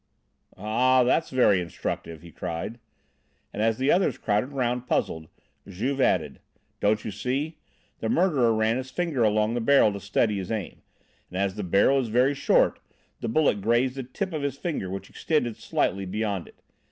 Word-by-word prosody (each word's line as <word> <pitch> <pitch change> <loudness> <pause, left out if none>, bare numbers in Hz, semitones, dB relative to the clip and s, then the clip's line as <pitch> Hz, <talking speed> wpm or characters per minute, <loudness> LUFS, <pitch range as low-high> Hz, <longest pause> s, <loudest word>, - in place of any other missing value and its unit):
"Ah! 125 +6 +3
that's 145 +6 +1
very 115 -8 +3
instructive!" 85 -1 -5
he 85 - -12
cried. 85 - -5 0.7
And 105 - -3
as 110 0 +2
the 135 +2 +2
others 185 +2 +2
crowded 105 +3 0
round, 125 -2 -1
puzzled, 80 -8 -1 0.4
Juve 125 +9 -2
added: - - +1 0.4
"Don't 105 +1 +1
you 110 - -3
see? 135 - -3 0.4
The 110 - -2
murderer 145 -8 +3
ran 110 +1 +1
his 130 0 -5
finger 165 -5 -2
along 110 0 +2
the 120 - -1
barrel 115 -3 +4
to 100 - -5
steady 100 +2 0
his 95 - -5
aim, 105 -5 -4 0.5
and 90 - -6
as 100 0 0
the 105 - -5
barrel 100 +9 +3
is 130 - -1
very 125 +5 +3
short, 135 - +2 0.4
the 115 - -3
bullet 115 -6 +2
grazed 120 +5 +2
the 135 - -5
tip 165 +9 -5
of 155 - -2
his 140 -1 -2
finger 145 - -3
which 95 +1 -6
extended 125 -8 -1
slightly 95 +1 -1
beyond 100 -2 -2
it. - - -20
115 Hz, 175 wpm, -26 LUFS, 100-130 Hz, 0.7 s, barrel